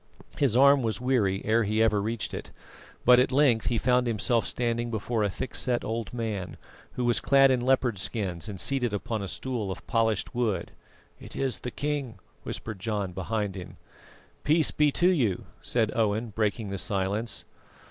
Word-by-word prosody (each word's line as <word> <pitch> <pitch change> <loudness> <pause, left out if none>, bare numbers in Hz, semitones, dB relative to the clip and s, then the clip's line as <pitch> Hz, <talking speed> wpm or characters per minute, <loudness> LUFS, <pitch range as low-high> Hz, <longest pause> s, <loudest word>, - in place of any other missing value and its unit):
His 130 -5 +3
arm 140 +1 +6
was 115 -2 -1
weary 115 -7 +1
ere 110 +2 +3
ever 110 0 +2
he - - -2
reached 115 0 -3
it, - - -6 0.6
but 125 0 +7
at 125 - +2
length 130 -5 +3
he 120 - +1
found 125 +1 +2
himself 115 +1 +1
standing 120 -1 -1
before 115 +1 -2
a 105 - +1
thickset 120 +5 -1
old 115 -1 -3
man, 110 -6 -4 0.4
who 125 - -2
was 120 -1 +2
clad 135 -1 +5
in 125 -2 +1
leopard 125 -4 +1
skins 95 -2 -3
and 100 -3 -6
seated 125 -3 0
upon 110 +1 -3
a 100 - -4
stool 120 -2 -3
of 95 - -6
polished 110 -4 0
wood. 110 -8 -1 0.5
"It - - -10
is 135 -2 -1
the 125 - -5
king," 140 -4 -3 0.2
whispered 110 -4 -6
John 105 -2 -2
behind 100 +2 -2
him. 90 -3 -9 0.7
"Peace 155 +1 +3
be 150 -1 +3
to 175 - +3
you," 120 - +1 0.2
said 110 -3 0
Owen, 110 0 0
breaking 105 0 -1
the 100 -1 -3
silence. 100 +3 -2
115 Hz, 175 wpm, -27 LUFS, 105-125 Hz, 0.7 s, but